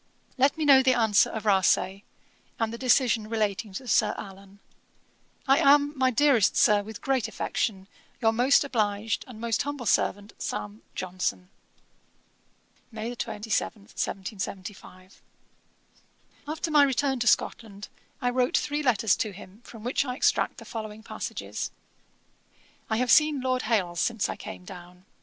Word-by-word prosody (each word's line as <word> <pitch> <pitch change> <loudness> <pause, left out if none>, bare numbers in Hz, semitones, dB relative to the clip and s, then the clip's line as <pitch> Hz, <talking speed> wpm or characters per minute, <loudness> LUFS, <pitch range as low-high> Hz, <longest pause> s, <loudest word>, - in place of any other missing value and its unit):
'Let 275 +2 +2
me 315 - -1
know 275 -2 +7
the 260 -1 +3
answer 220 -3 +3
of 220 -1 -6
Rasay, 190 -1 +2 0.6
and 225 0 -1
the - - -5
decision 240 -4 +2
relating 215 -2 -1
to 250 +7 -7
Sir 210 -1 +2
Allan. 195 0 -11 0.9
'I 270 +3 +5
am, 290 -1 +5
my 260 -1 +2
dearest 250 -4 +3
Sir, 210 -1 +5
with 210 0 -10
great 265 -4 0
affection, 195 -3 -3 0.3
'Your 225 -2 +3
most 250 +6 +4
obliged, 215 -5 -1
and 240 -4 -11
'Most 230 -1 0
humble 285 -3 -4
servant, 205 0 0
'SAM. 105 +1 -5
JOHNSON.' 185 0 -3 1.4
'May 225 +2 -5
27, 215 -2 -3
1775.' 190 -2 -6 1.3
After 315 +2 -3
my 300 -1 +6
return 270 -1 +1
to 240 - -1
Scotland, 205 -4 0 0.4
I 245 - +2
wrote 250 0 +1
three 295 +1 -1
letters 225 -6 +2
to 215 -2 -2
him, 195 +3 -13
from 225 -2 -12
which 250 +3 0
I 250 -2 -4
extract - - +1
the - - -11
following 220 -2 -7
passages: - - -5 1.2
'I 220 - +1
have 250 0 +1
seen 300 -2 +5
Lord 255 0 0
Hailes 180 -7 0
since 230 -4 0
I - - -3
came 180 - -9
down. 180 0 -12
225 Hz, 145 wpm, -27 LUFS, 200-255 Hz, 1.4 s, know